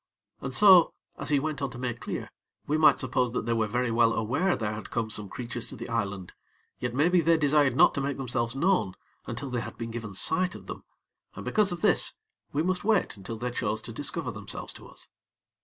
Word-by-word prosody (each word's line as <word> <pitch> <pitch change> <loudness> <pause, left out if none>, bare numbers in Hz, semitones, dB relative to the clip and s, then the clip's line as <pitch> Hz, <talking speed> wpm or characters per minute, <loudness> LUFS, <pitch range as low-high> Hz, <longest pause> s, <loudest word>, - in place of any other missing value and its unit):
And - - -5
so, 190 -5 +7 0.2
as - - 0
he 145 -2 +3
went 150 0 -3
on 140 - -1
to 120 - -10
make 120 -1 -3
clear, - - -5 0.3
we 150 - 0
might 155 0 +5
suppose 125 -2 +1
that 120 - -2
they 115 - 0
were 110 -2 +1
very 120 +2 -1
well 115 0 +3
aware 140 - +1
there 105 -2 -3
had 105 - -7
come 115 -2 -2
some 105 -2 -5
creatures 120 +2 -5
to - - -8
the 120 -1 -7
island; 100 -5 -3 0.5
yet, 125 -1 -3
maybe, 170 +5 +4
they 165 0 +4
desired 145 -3 +3
not - - +6
to 140 - -2
make 140 0 -2
themselves 120 -2 -2
known 170 - +1 0.3
until 140 -2 -5
they 120 -1 -1
had - - -8
been 115 -1 -5
given 115 -4 -6
sight 180 - +2
of - - -11
them, - - -8 0.5
and - - -8
because 210 -3 +2
of 175 -1 -5
this, - - +3 0.4
we 150 - 0
must 180 +1 -1
wait 215 -2 +1
until 105 +3 -7
they 125 +2 -3
chose 110 -3 -1
to 115 - -6
discover 145 +1 -1
themselves 100 -2 -6
to - - -12
us. - - -11
125 Hz, 225 wpm, -28 LUFS, 115-155 Hz, 0.5 s, so